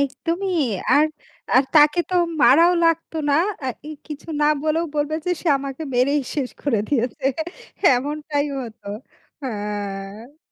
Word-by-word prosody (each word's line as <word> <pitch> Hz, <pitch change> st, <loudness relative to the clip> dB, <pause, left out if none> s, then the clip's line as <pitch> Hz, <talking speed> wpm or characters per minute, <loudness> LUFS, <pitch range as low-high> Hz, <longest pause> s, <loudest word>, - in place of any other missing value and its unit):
একদমই। 340 Hz, +7 st, -1 dB, 0.4 s
আর, 300 Hz, +2 st, +5 dB, 0.5 s
আর 260 Hz, -, +7 dB
তাকে 300 Hz, +2 st, +6 dB
তো -, -, -1 dB, 0.3 s
মারাও 335 Hz, +6 st, +6 dB
লাগত 330 Hz, 0 st, +1 dB, 0.2 s
না। -, -, +4 dB, 0.3 s
অ্যা 265 Hz, -, -3 dB, 0.2 s
এই 310 Hz, -, -6 dB
কিছু 300 Hz, +1 st, -9 dB
না -, -, +4 dB, 0.2 s
বলেও 315 Hz, +2 st, +1 dB
বলবে 295 Hz, +1 st, 0 dB
যে, -, -, +1 dB
সে 345 Hz, -, 0 dB
আমাকে 275 Hz, +2 st, -6 dB
মেরেই 275 Hz, +4 st, +2 dB
শেষ 270 Hz, -4 st, -2 dB
করে 265 Hz, -7 st, +1 dB
দিয়েছে। 260 Hz, +1 st, -1 dB, 0.7 s
এমনটাই 290 Hz, +2 st, -2 dB
হত, 235 Hz, -4 st, -7 dB, 0.6 s
হ্যাঁ। 205 Hz, +1 st, -5 dB
285 Hz, 135 wpm, -22 LUFS, 250-310 Hz, 0.7 s, আর